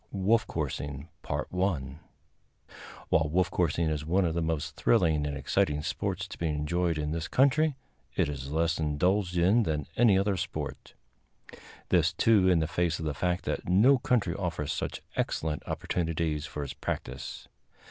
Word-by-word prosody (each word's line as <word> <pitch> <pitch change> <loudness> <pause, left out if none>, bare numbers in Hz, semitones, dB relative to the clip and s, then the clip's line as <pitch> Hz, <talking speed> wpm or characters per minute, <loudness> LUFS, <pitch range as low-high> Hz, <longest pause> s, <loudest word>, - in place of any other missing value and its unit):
_ - - -38
Wolf 105 +3 +2
Coursing 70 -1 -4 0.4
While 80 -2 -4
wolf 90 +2 +1
coursing 85 -1 +1
is 75 -1 -2
one 90 +5 +2
of 80 - 0
the 85 - -1
most 80 -3 -2
thrilling 75 -3 +2
and 70 -1 -3
exciting 75 +1 0
sports 95 +3 -2
to - - -10
be 85 - 0
enjoyed 80 +3 0
in 75 0 -2
this 80 0 -3
country, 140 +3 +3 0.4
it - - +2
is 70 -1 -5
less 80 +1 +1
indulged 90 +5 +1
in 95 +7 +4
than 75 -8 -1
any 110 -5 +5
other 100 0 +1
sport; - - -5 0.9
this, - - +3
too, 105 -5 +4
in 90 - +4
the 80 -1 +1
face 85 0 0
of 80 - -5
the 75 - -1
fact 90 +4 -1
that - - -3
no 120 +9 +5
country 115 -8 +1
offers 80 -6 -2
such - - -4
excellent 75 -1 -1
opportunities 80 -3 -2
for 75 - -5
its 70 - -5
practice. 65 +2 -5
85 Hz, 160 wpm, -29 LUFS, 75-95 Hz, 0.9 s, any